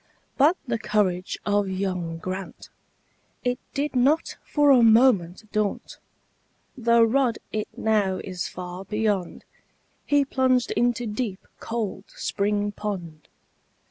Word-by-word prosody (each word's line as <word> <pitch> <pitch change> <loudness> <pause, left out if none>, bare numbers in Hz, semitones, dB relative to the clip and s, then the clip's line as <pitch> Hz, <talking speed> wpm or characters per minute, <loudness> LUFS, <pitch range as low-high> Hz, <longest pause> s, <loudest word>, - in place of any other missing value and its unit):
But 305 +6 +4
the 235 -3 -2
courage 185 -4 0
of 205 -1 +1
young 185 -3 -2
Grant, 185 +3 -6 0.7
It 245 -1 0 0.2
did 285 0 -1
not 275 +6 +2
for 290 -1 +3
a 255 -3 +6
moment 220 -4 +4
daunt, 210 -1 -2 0.8
Though 235 -2 +4
rod 240 0 +2
it 215 -1 -2
now 210 -4 +1
is 185 -2 -4
far 180 +1 -7
beyond, 205 -2 -2 0.6
He 290 -1 +3
plunged 260 -2 +1
into 240 0 +1
deep, 210 -3 -4
cold 215 -4 -4
spring 205 0 -1
pond. 180 -7 -6
215 Hz, 115 wpm, -25 LUFS, 190-245 Hz, 0.8 s, a